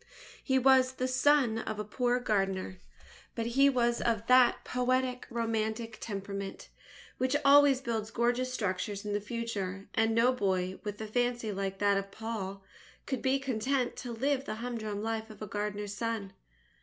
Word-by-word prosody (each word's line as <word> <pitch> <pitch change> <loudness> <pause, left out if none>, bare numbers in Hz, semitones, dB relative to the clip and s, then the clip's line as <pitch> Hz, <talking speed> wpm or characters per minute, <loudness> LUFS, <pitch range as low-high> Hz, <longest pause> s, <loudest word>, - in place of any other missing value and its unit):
He 265 -1 +2
was 260 0 +5
the 255 0 -2
son 255 -3 +3
of 215 -1 -4
a 210 - -2
poor 245 +3 0
gardener. 195 -5 -1 0.6
But 230 - -2
he 270 +4 +4
was 240 -3 +1
of 230 -2 0
that 250 0 +5
poetic 255 0 0
romantic 225 -1 -2
temperament, 200 -2 -5 0.5
which 260 +2 +1
always 280 -1 +7
builds 225 -4 -2
gorgeous 240 +2 0
structures 200 -2 -2
in 205 - -2
the 205 - 0
future; 200 -4 -4
and 225 0 +2
no 240 +3 +4
boy, 190 -5 -1
with 205 -1 -5
a - - -3
fancy 240 0 0
like 195 -1 -3
that 200 0 +3
of 195 - -5
John - - -20
Pul 200 -4 -5 0.4
could 265 -3 -3
be 265 +1 +2
content 260 0 -1
to 245 - -6
live 270 +4 0
the 215 - -4
humdrum 220 -3 -4
life 225 0 -3
of 215 - -12
a 215 - -5
gardener's 205 0 -3
son. 215 -2 -3
225 Hz, 170 wpm, -31 LUFS, 205-250 Hz, 0.6 s, always